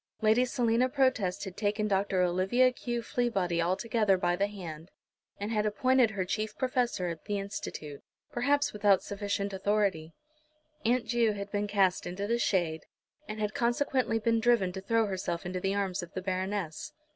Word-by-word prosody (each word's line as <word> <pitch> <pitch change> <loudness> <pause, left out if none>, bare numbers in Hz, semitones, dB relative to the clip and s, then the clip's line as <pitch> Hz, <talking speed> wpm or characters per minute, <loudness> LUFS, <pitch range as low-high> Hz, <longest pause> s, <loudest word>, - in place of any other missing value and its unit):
Lady 220 +3 +4
Selina 245 0 +1
Protest 255 -9 +1
had 190 -3 -7
taken 210 0 0
Dr. 195 -2 +1
Olivia 190 +9 +3
Q. 240 -1 -4
Fleabody 195 -10 0
altogether 195 +3 +2
by 175 -1 +1
the 200 +3 +1
hand, 170 -5 -8 0.5
and 205 +2 -3
had 210 -2 +1
appointed 255 +3 +3
her 195 -3 -2
chief 215 +3 -3
professor 245 -8 0
at 165 -2 -7
the 205 - -1
Institute, 155 -7 -6 0.3
perhaps 285 +4 +1
without 205 -2 +3
sufficient 200 0 -3
authority. 190 -5 0 0.7
Aunt 240 +1 +2
Ju 230 -1 +2
had 200 0 -6
been 205 0 -1
cast 195 -3 +2
into 185 +3 -4
the 235 +3 0
shade, 165 -8 0 0.4
and 215 0 -6
had 210 0 -1
consequently 245 -2 +1
been 230 +1 +1
driven 225 -5 +3
to 190 +1 -6
throw 225 +3 +2
herself 185 -4 -3
into 185 +1 -3
the 195 +2 -1
arms 195 -2 -1
of 175 +1 -10
the 185 - -2
Baroness. 185 -3 -3
205 Hz, 170 wpm, -30 LUFS, 185-230 Hz, 0.7 s, Lady